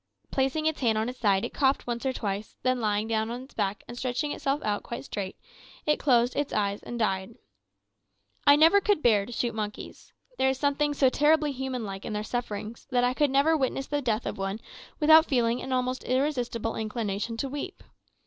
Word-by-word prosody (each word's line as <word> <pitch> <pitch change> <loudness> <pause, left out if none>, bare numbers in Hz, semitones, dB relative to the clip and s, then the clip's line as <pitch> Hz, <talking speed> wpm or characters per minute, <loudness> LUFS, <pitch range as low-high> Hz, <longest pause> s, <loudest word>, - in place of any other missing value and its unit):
Placing 270 +4 0
its 315 -1 0
hand 225 -4 +2
on 220 +2 0
its 250 - -8
side, 200 -3 +2
it - - -6
coughed 270 -1 +2
once 240 +2 -3
or - - +2
twice, 205 -4 -4
then 255 -1 +1
lying 210 0 0
down 220 0 0
on 245 +2 -5
its 265 - -16
back 205 -1 -2
and 240 - -8
stretching 255 +4 -2
itself 275 +1 -1
out 205 -1 -1
quite 235 - -7
straight, 195 -6 -5 0.5
it 300 - +2
closed 245 -3 +3
its 290 -1 -1
eyes 200 -1 -1
and 240 - -6
died. 195 -1 -1 1.1
I 285 - +9
never 325 +7 +6
could 405 -5 +1
bear 210 -4 +4
to - - -8
shoot 235 0 -1
monkeys. 210 -1 -6 0.3
There 265 - +3
was 265 0 +1
something 290 +1 +1
so 270 -2 +4
terribly 300 +2 +3
human 260 -2 -4
like 195 -1 -6
in 220 - -4
their 210 0 -2
sufferings, 215 -1 -5
that 250 -2 +2
I 250 0 +2
never 275 +4 +3
could 320 - +2
witness 270 0 -1
the 290 +1 -2
death 230 -3 -1
of - - -4
one 195 +2 -2 0.4
without 315 +1 +7
feeling 240 -2 +1
an 265 - -6
almost 255 0 -1
irresistible 250 -4 -1
inclination 220 0 -3
to 275 - -2
weep. 290 +8 -6
245 Hz, 205 wpm, -27 LUFS, 215-275 Hz, 1.1 s, I